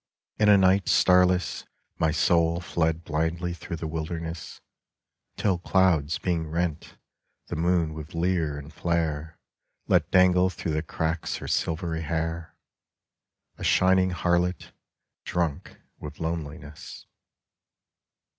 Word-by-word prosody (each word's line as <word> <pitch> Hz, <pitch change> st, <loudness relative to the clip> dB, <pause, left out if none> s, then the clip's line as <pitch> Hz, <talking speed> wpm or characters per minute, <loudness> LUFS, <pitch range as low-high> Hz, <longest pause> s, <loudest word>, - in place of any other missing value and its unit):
In 105 Hz, -1 st, +4 dB
a 100 Hz, -, +8 dB
night 95 Hz, 0 st, +3 dB
starless 90 Hz, -1 st, +3 dB, 0.4 s
My 80 Hz, -, +3 dB
soul 85 Hz, +2 st, +2 dB
fled 80 Hz, -2 st, -1 dB
blindly 85 Hz, +3 st, -2 dB
through 85 Hz, +1 st, -6 dB
the 80 Hz, -, -6 dB
wilderness, 80 Hz, +1 st, -5 dB, 0.8 s
Till 95 Hz, -4 st, +1 dB
clouds 85 Hz, -5 st, +2 dB
being 85 Hz, -3 st, -2 dB
rent, 85 Hz, -1 st, -3 dB, 0.5 s
the -, -, -3 dB
moon 85 Hz, -1 st, +1 dB
with 80 Hz, +1 st, -9 dB
leer 85 Hz, -4 st, 0 dB
and 75 Hz, +2 st, -10 dB
flare 80 Hz, -2 st, -2 dB, 0.5 s
Let -, -, +3 dB
dangle 90 Hz, 0 st, +4 dB
through 85 Hz, -2 st, -4 dB
the 75 Hz, -, 0 dB
cracks 80 Hz, +1 st, -2 dB
her -, -, -8 dB
silvery 80 Hz, 0 st, -1 dB
hair 80 Hz, +1 st, -3 dB, 0.5 s
— -, -, -52 dB
A -, -, -6 dB
shining 95 Hz, 0 st, +4 dB
harlot, 90 Hz, 0 st, 0 dB, 0.5 s
drunk 85 Hz, -5 st, -3 dB, 0.2 s
with -, -, -9 dB
loneliness. 75 Hz, -2 st, -6 dB
85 Hz, 115 wpm, -26 LUFS, 80-90 Hz, 0.8 s, a